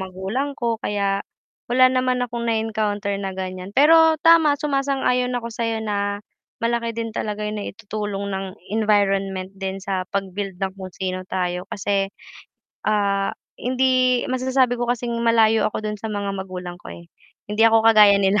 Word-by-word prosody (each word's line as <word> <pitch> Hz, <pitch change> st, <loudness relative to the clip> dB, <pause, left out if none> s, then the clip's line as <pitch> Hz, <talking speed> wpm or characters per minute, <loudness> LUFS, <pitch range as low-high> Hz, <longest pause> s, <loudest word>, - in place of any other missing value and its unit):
magulang 190 Hz, +9 st, -3 dB
ko 230 Hz, -3 st, -1 dB
kaya 200 Hz, -1 st, 0 dB, 0.5 s
wala 255 Hz, +1 st, +5 dB
naman 255 Hz, -1 st, +1 dB
akong 235 Hz, -1 st, -5 dB
na-encounter 215 Hz, -2 st, -1 dB
na 195 Hz, -1 st, -3 dB
gan'yan. 185 Hz, 0 st, -6 dB
Pero 320 Hz, +4 st, +6 dB
tama 325 Hz, -3 st, +6 dB
sumasang-ayon 275 Hz, -3 st, 0 dB
ako 235 Hz, -1 st, -4 dB
sa'yo 225 Hz, -1 st, -2 dB
na 205 Hz, -1 st, -2 dB, 0.4 s
malaki 230 Hz, -1 st, -1 dB
din 230 Hz, -1 st, -3 dB
talaga 210 Hz, -1 st, -3 dB
yung 210 Hz, 0 st, -3 dB
naitutulong 205 Hz, -1 st, -5 dB
ng 195 Hz, 0 st, -3 dB, 0.3 s
environment 195 Hz, -3 st, +1 dB
din 190 Hz, 0 st, -4 dB
sa 190 Hz, -2 st, -2 dB
pag-build 195 Hz, 0 st, -4 dB
ng 190 Hz, 0 st, -2 dB
kung 185 Hz, -2 st, -8 dB
sino 185 Hz, -1 st, -3 dB
tayo 180 Hz, 0 st, -2 dB
kasi, 195 Hz, -1 st, -1 dB, 0.8 s
ah, 200 Hz, -2 st, +1 dB, 0.3 s
hindi 255 Hz, 0 st, +2 dB
masasabi 255 Hz, 0 st, +2 dB
ko 240 Hz, -, -1 dB
kasing 245 Hz, 0 st, -1 dB
malayo 225 Hz, -1 st, +4 dB
ako 215 Hz, -, -6 dB
do'n 210 Hz, -1 st, -4 dB
sa 220 Hz, -, -4 dB
mga 200 Hz, -2 st, -3 dB
magulang 180 Hz, -2 st, -6 dB
ko, -, -, -11 dB
eh. 170 Hz, -, -13 dB, 0.4 s
Hindi 210 Hz, +2 st, -4 dB
ako 225 Hz, 0 st, +3 dB
kagaya 210 Hz, -3 st, +7 dB
nila, 200 Hz, +1 st, +2 dB
210 Hz, 155 wpm, -22 LUFS, 195-235 Hz, 0.8 s, kagaya